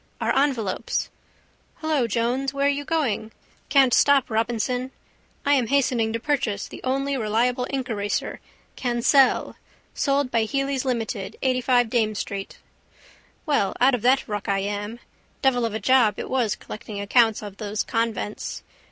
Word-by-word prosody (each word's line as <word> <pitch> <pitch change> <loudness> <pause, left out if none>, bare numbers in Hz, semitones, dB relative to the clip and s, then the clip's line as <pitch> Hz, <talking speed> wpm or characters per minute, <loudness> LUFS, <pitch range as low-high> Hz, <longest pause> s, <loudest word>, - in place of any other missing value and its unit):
Our - - 0
envelopes. 255 -9 0 0.6
Hello, 310 -6 0
Jones, 245 +5 -1
where 280 0 +1
are - - +5
you 285 0 -1
going? 275 -9 -1 0.4
Can't 270 -3 +5
stop, 280 -4 +4
Robinson, 240 +3 -1 0.6
I 285 - +4
am 255 -5 +2
hastening 250 -4 +1
to 230 - -2
purchase 235 -7 -1
the - - -10
only 275 +2 0
reliable 245 +3 0
inkeraser 225 -7 -2 0.4
Kansell, 250 +2 +2 0.4
sold 275 -2 0
by 230 -1 +2
Hely's 275 +2 -1
Ltd, 225 -5 -2
85 255 -2 +2
Dame 220 -3 +1
street. 200 -1 -5 0.9
Well 285 - +1
out 265 +2 +5
of 245 - 0
that 255 +3 +3
ruck 210 -2 -4
I 195 0 +1
am. 205 +3 -4 0.4
Devil 245 -3 +3
of 220 -2 -3
a - - -1
job 255 -5 +3
it - - -6
was 245 -5 +1
collecting 210 -1 -8
accounts 220 +1 +3
of 200 -1 -8
those 210 -1 -2
convents. 225 -2 -3
245 Hz, 145 wpm, -24 LUFS, 220-270 Hz, 0.9 s, are